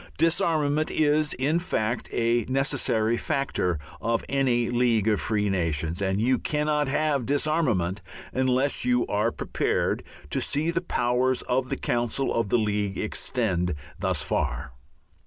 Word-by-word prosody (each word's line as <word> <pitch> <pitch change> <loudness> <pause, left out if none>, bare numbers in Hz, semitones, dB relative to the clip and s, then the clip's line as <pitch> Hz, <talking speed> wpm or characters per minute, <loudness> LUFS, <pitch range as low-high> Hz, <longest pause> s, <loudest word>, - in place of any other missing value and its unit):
Disarmament 155 -3 +2
is, 150 0 +2
in 145 +6 +1
fact, 120 -9 -2
a 115 0 +1
necessary 130 -4 +1
factor 135 - -1 0.2
of 115 +1 0
any 125 -4 +1
League 120 -3 +2
of 105 -2 +2
Free 105 -1 0
Nations, 85 -2 -1
and 95 0 0
you 125 +3 +2
cannot 150 -1 0
have 145 -1 +1
disarmament 135 - +1 0.3
unless 130 +2 +1
you 125 -1 +2
are 105 +3 0
prepared - - -1 0.3
to - - 0
see 155 +4 0
the 170 - -1
powers 125 -4 +1
of 130 +1 0
the - - -2
council 120 +3 -1
of 115 -3 0
the 120 - +3
League 105 -3 -1
extend 95 - -1 0.2
thus - - 0
far. - - -2
125 Hz, 140 wpm, -26 LUFS, 110-145 Hz, 0.3 s, the